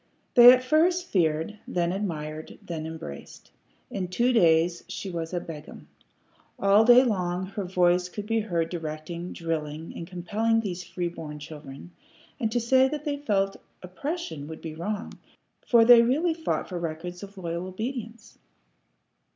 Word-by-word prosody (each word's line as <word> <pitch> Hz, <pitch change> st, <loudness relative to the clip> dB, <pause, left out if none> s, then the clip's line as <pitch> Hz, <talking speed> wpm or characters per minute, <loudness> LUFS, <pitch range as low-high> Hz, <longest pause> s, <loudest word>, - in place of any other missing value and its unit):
They 245 Hz, -1 st, +11 dB
at 255 Hz, 0 st, +3 dB
first 345 Hz, +6 st, +3 dB
feared, 165 Hz, +3 st, 0 dB
then 175 Hz, -1 st, 0 dB
admired, 155 Hz, -5 st, -5 dB
then 160 Hz, -2 st, -5 dB
embraced. 160 Hz, -, -9 dB, 0.4 s
In 185 Hz, -2 st, -3 dB
two 240 Hz, +8 st, +1 dB
days 170 Hz, -4 st, +3 dB
she 195 Hz, -, -6 dB
was 165 Hz, -1 st, -4 dB
a 180 Hz, -, -1 dB
Begum. 160 Hz, -3 st, -10 dB, 0.7 s
All 200 Hz, +2 st, +5 dB
day 245 Hz, +2 st, +8 dB
long 185 Hz, -6 st, -1 dB
her 195 Hz, +1 st, -5 dB
voice 180 Hz, 0 st, +2 dB
could 205 Hz, +2 st, -6 dB
be 225 Hz, +1 st, +1 dB
heard 170 Hz, -6 st, -1 dB
directing, 165 Hz, +1 st, -5 dB
drilling, 160 Hz, -1 st, -4 dB
and 165 Hz, -, -7 dB
compelling 210 Hz, +6 st, 0 dB
those 180 Hz, -4 st, -4 dB
free 175 Hz, -1 st, -3 dB
born 155 Hz, -3 st, -8 dB
children; 150 Hz, +1 st, -10 dB, 0.5 s
and 225 Hz, -4 st, -1 dB
to 240 Hz, -, +1 dB
say 260 Hz, +3 st, +4 dB
that 300 Hz, +2 st, -5 dB
they 290 Hz, -1 st, -1 dB
felt 195 Hz, -8 st, 0 dB, 0.3 s
oppression 185 Hz, -, -5 dB
would 160 Hz, 0 st, -8 dB
be 160 Hz, -2 st, -6 dB
wrong, 200 Hz, +6 st, -5 dB, 0.5 s
for 230 Hz, -2 st, +6 dB
they 240 Hz, 0 st, +9 dB
really 300 Hz, +9 st, +2 dB
fought 320 Hz, 0 st, -2 dB
for 180 Hz, -2 st, -5 dB
records 170 Hz, +2 st, -5 dB
of 200 Hz, 0 st, -11 dB
loyal 170 Hz, 0 st, -4 dB
obedience. 225 Hz, +3 st, -6 dB
180 Hz, 155 wpm, -26 LUFS, 165-225 Hz, 0.7 s, They